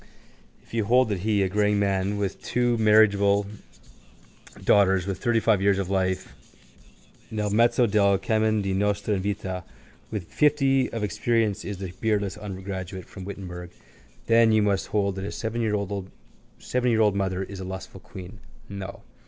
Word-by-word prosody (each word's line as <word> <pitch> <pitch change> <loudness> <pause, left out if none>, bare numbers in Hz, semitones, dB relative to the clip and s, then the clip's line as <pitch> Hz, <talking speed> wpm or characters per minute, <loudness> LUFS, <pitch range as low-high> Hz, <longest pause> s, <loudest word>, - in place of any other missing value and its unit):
If - - -22
you 115 -2 0
hold 125 +2 +4
that 100 -3 -1
he, 105 +1 +1
a - - +1
greying 105 +1 +1
man 100 0 0
with 100 -2 -3
two 120 -1 +1
marriageable 100 -2 +4 1.2
daughters, 95 -3 +4
with 95 -2 -4
thirtyfive 115 -4 +2
years 100 0 +3
of 95 -1 -3
life, 95 -1 -1 1.0
nel 105 -2 -2
mezzo 120 +3 +4
del 100 -2 +3
cammin 110 +1 +1
di 95 -1 -1
nostra 100 +1 0
vita, 95 -2 -3 0.5
with 105 -4 -4
fifty 135 - +2
of 115 -2 -3
experience, 110 0 0
is 100 -1 -5
the 95 -2 -6
beardless 105 -3 0
undergraduate 95 -2 -6
from 95 -2 -10
Wittenberg 90 -3 -7 0.6
then 115 0 +5
you 110 -1 +4
must 100 -2 0
hold 100 -2 0
that 95 - -4
his 100 - -5
seventyyear 110 -1 -2
old 105 +3 -2
mother 95 -1 -1
is 100 0 -8
the - - -5
lustful 95 +1 -7
queen. 95 +2 -10 0.3
No. 100 -1 -7
100 Hz, 150 wpm, -25 LUFS, 95-110 Hz, 1.2 s, then